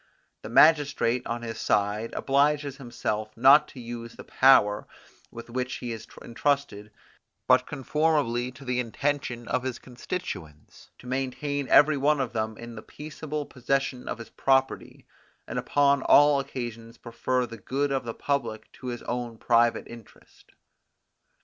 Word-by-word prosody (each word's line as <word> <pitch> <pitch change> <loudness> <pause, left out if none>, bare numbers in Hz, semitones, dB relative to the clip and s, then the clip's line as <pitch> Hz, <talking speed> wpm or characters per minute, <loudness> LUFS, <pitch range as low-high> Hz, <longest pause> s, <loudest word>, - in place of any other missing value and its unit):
The - - -8
magistrate, 145 -3 +4
on 120 0 -4
his 115 -1 -6
side, 105 +2 0
obliges 140 0 +1
himself 110 -4 -4
not 140 +5 +7
to 130 - -12
use 115 -1 -8
the - - -10
power 125 -6 +4 0.4
with 115 - -10
which 125 +1 -3
he 120 - -5
is 115 -1 -7 0.2
intrusted 120 -5 -1 0.6
but - - +4
conformably 145 -4 0
to 135 +2 -13
the 125 0 -1
intention 125 0 -2
of 125 - 0
his 130 -1 -4
constituents, 120 - -8
to - - -17
maintain 135 +2 -3
every 150 0 +6
one 145 +2 +2
of 130 -4 -2
them 110 -1 -2
in 115 0 -9
the 110 - -8
peaceable 150 +1 -6
possession 135 0 -2
of - - -3
his 115 -2 -11
property, 135 0 0 0.4
and - - -3
upon 140 -1 +2
all 145 0 +5
occasions 120 -3 -6
prefer 125 +2 -2
the 115 -2 -10
good 140 +7 -2
of 135 -1 -1
the 115 -1 -6
public 135 -6 -3
to 130 - -10
his 120 -1 -5
own 120 -1 -4
private 120 0 +2
interest. 115 -2 -16
125 Hz, 150 wpm, -26 LUFS, 115-140 Hz, 0.6 s, not